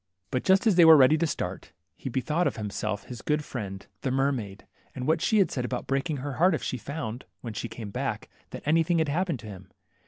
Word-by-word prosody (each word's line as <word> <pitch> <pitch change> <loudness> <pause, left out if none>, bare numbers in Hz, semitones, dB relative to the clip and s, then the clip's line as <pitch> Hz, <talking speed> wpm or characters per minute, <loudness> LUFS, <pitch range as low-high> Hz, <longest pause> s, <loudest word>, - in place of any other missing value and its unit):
But 125 - -1
just 190 +2 +4
as 210 -5 +4
they 175 - +8
were 160 -1 +10
ready 140 +2 +6
to 170 - +2
start, - - -5 0.2
he 130 - -6
bethought 150 +7 0
himself 105 -1 -3
of - - -20
his 120 -1 -7
good 150 0 0
friend, 100 -6 -6 0.2
the 135 - -1
n;Lermaid, 130 -7 -1 0.3
and 130 -1 -4
what 160 +1 +2
she 220 - +2
had 195 - +3
said 125 - -2
about 125 0 -3
breaking 140 +2 -1
her 135 0 -5
heart 185 +2 +5
if - - -5
she 130 - -2
found, 135 -3 -5 0.2
when 115 -3 -6
she 115 +2 -4
came 110 -2 -7
back, - - -3 0.2
that - - -8
anything 165 +3 +3
had 160 -2 +1
happened 165 -3 -1
to - - -12
him. 95 -2 -10
135 Hz, 230 wpm, -27 LUFS, 115-160 Hz, 0.3 s, were